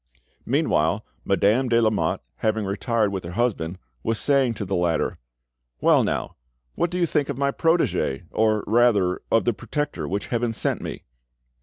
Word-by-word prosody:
Meanwhile - - +1 0.2
Madame 120 +6 +2
de 115 0 +4
Lamotte, 110 -2 +1 0.2
having 110 -1 0
retired 105 +2 0
with 95 -2 -4
her 85 +1 -7
husband, 95 -7 -1 0.2
was 115 - -1
saying 135 -3 +2
to 100 - -4
the 95 +1 -2
latter— 85 -2 0 0.6
"Well, - - +4
now! - - -2 0.4
what 170 - 0
do 180 - -3
you 175 - +3
think 150 -3 0
of 140 - -3
my 140 0 +1
protege, 135 - +1
or 110 -1 +2
rather, 105 -5 +3
of 115 - +3
the 120 - +2
protector 145 - -3
which 100 +4 -3
Heaven 120 -1 0
sent - - -1
me?" - - -6
110 Hz, 165 wpm, -24 LUFS, 100-130 Hz, 0.6 s, de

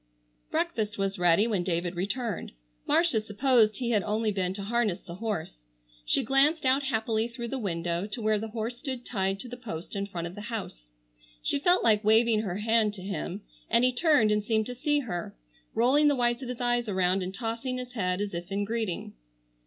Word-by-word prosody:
Breakfast 215 0 -1
was 195 0 -1
ready 175 +4 +4
when 210 -6 0
David 175 0 -1
returned. 205 +3 -3 0.3
Marcia 330 -11 +3
supposed 215 0 +3
he 240 -2 -1
had 210 -3 +3
only 215 +2 0
been 185 -2 0
to 200 - -5
harness 215 -3 0
the 170 - -10
horse. 205 - -3 0.5
She - - +2
glanced 275 +5 +3
out 260 +2 +4
happily 225 -4 0
through 235 0 -6
the 270 - -3
window 170 -2 -2
to 215 - -5
where 215 -1 +2
the 225 - -4
horse 230 +2 -4
stood 260 -3 -5
tied 195 -3 -1
to - - -8
the 245 0 -7
post 205 -7 -7
in 200 0 -2
front 175 -4 -5
of 170 - -6
the 205 - -8
house. 195 - -5 0.6
She - - +1
felt 355 +5 +3
like 215 -1 +4
waving 220 +1 +5
her 190 -4 -3
hand 220 0 +2
to 185 - -9
him, 195 0 -4 0.3
and 235 +2 +4
he 255 0 +4
turned 250 -6 +4
and 210 0 +2
seemed 220 0 +1
to 250 - -5
see 295 +3 +1
her; 175 -9 -5 0.4
rolling 260 +6 +4
the 290 - +4
whites 240 0 +1
of 255 - -6
his 250 - -5
eyes 240 -2 +1
around, 185 0 +1
and 185 0 -3
tossing 230 +4 -3
his 250 0 -6
head 185 -4 -1
as 205 -2 -3
if 175 +3 -5
in 200 +1 0
greeting. 220 -4 -3
220 Hz, 205 wpm, -28 LUFS, 195-240 Hz, 0.6 s, waving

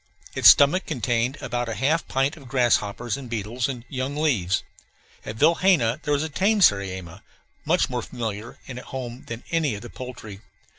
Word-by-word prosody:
Its - - +7
stomach 150 +7 +5
contained 125 -1 -1
about 120 0 -2
half 135 +9 +1
a - - -27
pint 135 +3 0
of 140 -5 -14
grass 125 -2 +3
hoppers 110 +4 -4
and 135 -3 -9
beetles 115 +3 -2
and 125 -3 -6
young 135 +1 -4
leaves. 110 - +1 0.6
At 110 - -6
Vilhena 165 - +3
there 150 - -1
was 145 - -1
a - - -2
tame 200 +7 +1
sariema, 95 - +1 0.4
much - - +2
more - - -3
familiar 110 -1 -6
and 125 -1 -7
at - - -12
home 125 -2 -7
than 115 0 -7
any 160 -8 +1
of 105 - -9
the 120 - -10
poultry. 120 -6 -9
125 Hz, 185 wpm, -24 LUFS, 115-140 Hz, 0.6 s, Its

